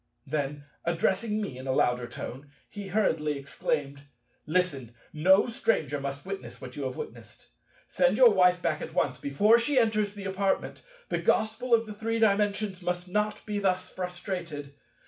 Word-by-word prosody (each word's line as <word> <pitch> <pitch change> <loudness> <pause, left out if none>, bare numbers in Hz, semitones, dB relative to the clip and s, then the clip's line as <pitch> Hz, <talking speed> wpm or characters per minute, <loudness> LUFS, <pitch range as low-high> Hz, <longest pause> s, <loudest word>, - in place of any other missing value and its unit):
Then, 145 0 -2 0.2
addressing 190 +6 0
me 135 -12 -4
in 130 - -8
a - - +1
louder 125 -1 +2
tone, 130 +3 -8 0.2
he 205 -1 -8
hurriedly 160 -7 +1
exclaimed, 140 0 -3 0.5
"Listen: 150 -9 -1 0.2
no 190 +6 +5
stranger 155 - 0
must 140 +2 -5
witness 195 0 -6
what - - -9
you - - -4
have - - -3
witnessed. 460 - -9 0.4
Send - - +2
your - - +8
Wife 180 - +4
back 155 -2 0
at - - -7
once, - - +1
before 205 +12 +4
she 270 +4 0
enters 215 -3 +2
the 200 -1 -7
apartment. 195 0 -1 0.3
The - - 0
Gospel 225 +3 +2
of 215 -2 -3
Three 225 +1 -1
Dimensions 205 -2 +1
must 180 0 -2
not 210 +2 -1
be 210 -1 -2
thus 185 -2 0
frustrated. 175 -5 -5
185 Hz, 160 wpm, -28 LUFS, 145-210 Hz, 0.5 s, your